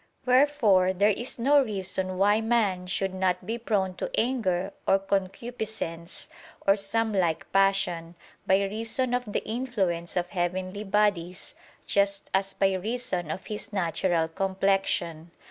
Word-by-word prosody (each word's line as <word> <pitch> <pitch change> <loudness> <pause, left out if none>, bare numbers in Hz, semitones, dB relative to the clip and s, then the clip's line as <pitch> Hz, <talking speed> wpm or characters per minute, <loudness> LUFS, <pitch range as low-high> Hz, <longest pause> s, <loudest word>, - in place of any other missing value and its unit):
Wherefore 250 -9 +4
there 200 +3 +3
is 240 +5 -3
no 280 +4 +5
reason 190 -5 -2
why 205 +3 +4
man 210 -6 +1
should 190 +1 -1
not 185 -1 0
be 230 +2 -3
prone 200 -5 0
to - - -3
anger 200 -6 0
or 195 - +5
concupiscence, 195 -2 -3 0.4
or 195 - +5
some 215 +2 -1
like 175 -5 0
passion, 195 -4 +1 0.3
by 190 +1 +4
reason 225 +5 -1
of 245 -4 -1
the - - -2
influence 200 -8 -2
of 175 0 0
heavenly 185 +2 -2
bodies, 195 -3 0 0.3
just 200 0 0
as 195 0 0
by 195 -1 +2
reason 190 -4 -2
of 185 +4 -5
his 210 0 -5
natural 170 -3 0
complexion. 190 -2 0
195 Hz, 135 wpm, -27 LUFS, 185-220 Hz, 0.4 s, no